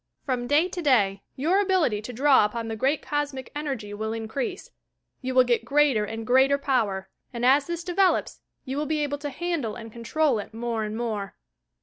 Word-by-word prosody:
From 250 -3 -1
day 300 +6 +3
to 365 -1 -5
day, 205 -10 +3
your 345 +9 +2
ability 365 - +1
to 225 - -7
draw 265 +1 +5
upon 225 +2 -2
the 225 - -3
great 270 +6 0
Cosmic 285 -3 -3
Energy 270 -9 -4
will 220 +1 -3
increase. 225 +4 -4 0.5
You 260 -1 -3
will 255 - +7
get 240 -2 +1
greater 270 -4 +3
and 225 +1 -6
greater 265 +4 +4
power, 215 -9 -1 0.2
and 240 0 -2
as 275 +2 +4
this 340 -1 -4
develops, 365 +2 +1 0.2
you 265 +1 -4
will 300 0 -1
be 310 -1 0
able 285 0 -2
to 290 0 -4
handle 300 -7 -3
and 225 -2 -9
control 255 +2 +1
it 210 - -8
more 230 -1 -2
and 215 +1 -4
more. 215 -5 -3
255 Hz, 195 wpm, -26 LUFS, 225-290 Hz, 0.5 s, will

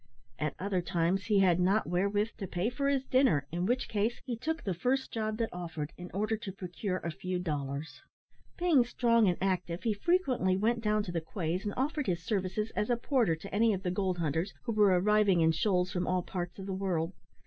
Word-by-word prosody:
At 150 -2 -1
other 190 -1 -1
times 175 +2 0
he 205 -3 +3
had 180 -2 +4
not 195 +4 +3
wherewith 200 +5 +1
to 195 - -4
pay 180 +7 -1
for 275 +3 0
his 275 -2 +1
dinner, 255 - +3
in 175 +2 -1
which 250 +2 0
case 220 +2 -1
he 245 - -2
took 320 +8 -3
the 190 - -1
first 255 +10 0
job 215 -1 -2
that 230 -1 -2
offered 165 -4 -5
in 180 0 -9
order 215 +3 0
to 205 -2 -6
procure 185 0 -4
a 170 - -4
few 185 +3 -3
dollars. 145 -3 -4 0.6
Being 335 -8 +4
strong 230 -2 +3
and 175 - 0
active, 180 -2 -1
he 225 -3 +2
frequently 250 - +1
went 230 +3 +1
down 210 -1 +1
to 180 - -5
the 170 -1 -1
quays 170 +2 -3
and 205 - -2
offered 295 +3 -1
his 175 -2 -1
services 200 +3 -1
as 210 - 0
a 240 - +2
porter 235 - +2
to 180 +5 -10
any 220 +2 +4
of 190 - -7
the 180 - 0
gold 185 -1 0
hunters 165 +3 -1
who - - -2
were 210 -2 +4
arriving 205 -2 +4
in 160 0 +5
shoals 180 +2 +1
from 180 -1 -2
all 180 -1 +1
parts 175 -1 -5
of 195 - -7
the 195 - -3
world. 185 -3 -1
195 Hz, 220 wpm, -31 LUFS, 175-225 Hz, 0.6 s, in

